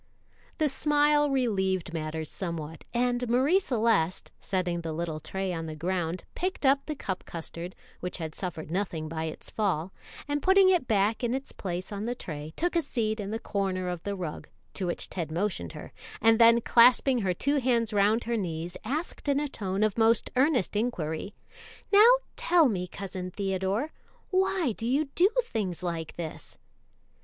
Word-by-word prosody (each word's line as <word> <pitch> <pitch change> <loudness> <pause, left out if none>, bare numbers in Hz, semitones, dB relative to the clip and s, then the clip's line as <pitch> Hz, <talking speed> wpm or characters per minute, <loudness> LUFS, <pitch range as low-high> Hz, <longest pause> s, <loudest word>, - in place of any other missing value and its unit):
The 310 - +2
smile 295 +1 +3
relieved 190 -10 0
matters 160 -1 -3
somewhat, 165 -3 -5
and 245 0 0
Marie 270 +10 +4
Celeste, 225 - +1
setting 180 -3 -1
the 165 -1 -4
little 160 -1 -3
tray 190 +4 -3
on 165 -1 -4
the 155 - -5
ground, 175 +1 -2
picked 370 -4 -2
up 275 +1 +3
the 305 - -2
cup 190 -8 -4
custard, 170 +2 -7 0.2
which 180 0 -4
had 160 -3 -5
suffered 165 -4 -5
nothing 175 -4 -2
by 160 0 -3
its 160 - -7
fall, 190 -4 -1 0.3
and 290 0 -1
putting 380 +2 +6
it 350 -9 +2
back 215 +2 +2
in 240 +1 +1
its 270 +1 -5
place 180 0 -5
on 205 +1 -4
the 245 +1 -2
tray, 155 -7 -6
took 350 +1 -1
a 335 - +4
seat 225 -7 -1
in 200 -1 -4
the 220 - -2
corner 190 -4 -2
of 175 -2 -4
the 200 +2 -3
rug, 175 -5 -5 0.3
to 185 - -3
which 175 - -3
Ted 170 -4 -4
motioned 170 - -2
her, - - -9 0.3
and 225 0 +5
then 230 0 +7
clasping 250 +2 +5
her 185 -4 0
two 285 - +1
hands 235 -4 +1
round 210 +3 +3
her 235 0 -1
knees, 170 -3 -3
asked 295 +8 -4
in 280 0 +3
a 295 - -1
tone 195 -5 -2
of 215 +1 +1
most 225 0 +3
earnest 255 - +2
inquiry, 200 -5 -2 0.6
"Now 420 +3 +9 0.3
tell 355 - +4
me, 180 -4 -2
Cousin 185 -1 -6
Theodore, 195 - -1 0.4
why 375 -6 +2
do 225 +2 -4
you 280 +4 +1
do 370 +3 +5
things 200 - -3
like 165 -2 -3
this?" 165 -2 -7
205 Hz, 175 wpm, -28 LUFS, 175-255 Hz, 0.6 s, Now